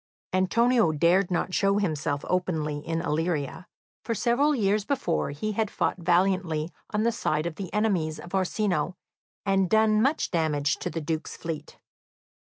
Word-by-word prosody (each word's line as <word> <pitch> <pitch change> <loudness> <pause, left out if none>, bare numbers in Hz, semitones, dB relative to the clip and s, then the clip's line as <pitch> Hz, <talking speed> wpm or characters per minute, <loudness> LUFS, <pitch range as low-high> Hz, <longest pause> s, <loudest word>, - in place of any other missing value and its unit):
Antonio 225 +2 +3
dared 175 +5 +3
not 180 +1 -1
show 195 +1 +2
himself 150 -7 -1
openly 160 -5 -1
in 165 +2 -3
Illyria, 165 0 -2 0.4
for 230 - -2
several 260 +7 +2
years 210 -3 +1
before 230 - -1
he 145 +10 -3
had 215 0 -1
fought - - -1
valiantly 175 -2 +1 0.2
on 210 0 0
the 235 - +3
side 155 -7 -1
of 170 - -2
the 185 +1 -7
enemies 190 -8 0
of 175 - -11
Orsino, 190 -1 0 0.5
and 195 -2 +2
done 220 -1 +4
much 275 +6 +1
damage 150 -4 +1
to - - -4
the 165 - -4
Duke's 160 +1 -3
fleet. 165 -2 -6
185 Hz, 155 wpm, -27 LUFS, 160-210 Hz, 0.5 s, done